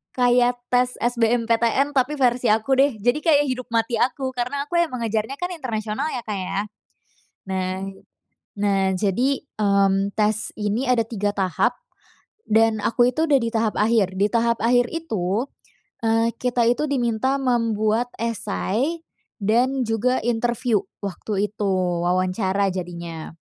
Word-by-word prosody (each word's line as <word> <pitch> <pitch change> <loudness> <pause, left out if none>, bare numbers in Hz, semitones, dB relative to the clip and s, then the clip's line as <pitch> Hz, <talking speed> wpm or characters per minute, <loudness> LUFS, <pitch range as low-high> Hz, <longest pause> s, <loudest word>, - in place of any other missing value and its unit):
kayak 245 0 +2
tes 250 0 +2
SBMPTN 235 +3 +1
tapi 275 +2 +1
versi 245 -1 +2
aku 220 +4 +2
deh. 275 -4 +4
Jadi 245 +7 +1
kayak 290 -2 +3
hidup 255 -1 -5
mati 230 0 0
aku, 265 0 0
karena 255 +3 -2
aku 345 -1 +1
emang 255 -9 -1
ngejarnya 220 +4 -1
kan 355 0 -3
internasional 240 -3 -3
ya, 245 - -4
Kak, 210 -2 -4
ya. 195 +1 -3 0.9
Nah 185 0 -2 0.8
nah, 195 -2 +2
jadi, 245 +8 +1 0.2
mmm, 200 0 +2
tes 215 0 +1
ini 210 +5 -1
ada 230 -3 +3
3 205 -3 -1
tahap 185 -3 +1 0.7
dan 220 0 +3
aku 240 +2 +3
itu 320 +5 0
udah 280 -2 +5
di 230 0 -1
tahap 225 -1 0
akhir. 210 -4 +2
Di 205 - +5
tahap 235 0 +2
akhir 245 +1 +3
itu, 225 - -2 0.6
eee, 225 +1 +3
kita 245 -2 +1
itu 270 +5 +1
diminta 260 -1 0
membuat 230 -1 +1
essay 230 - -2 0.4
dan 250 +5 +2
juga 240 +3 +1
interview 240 -1 0 0.2
waktu 200 +1 -2
itu, 210 -2 -2 0.4
wawancara 185 +2 +1
jadinya. 170 -3 -6
230 Hz, 140 wpm, -22 LUFS, 205-250 Hz, 0.9 s, udah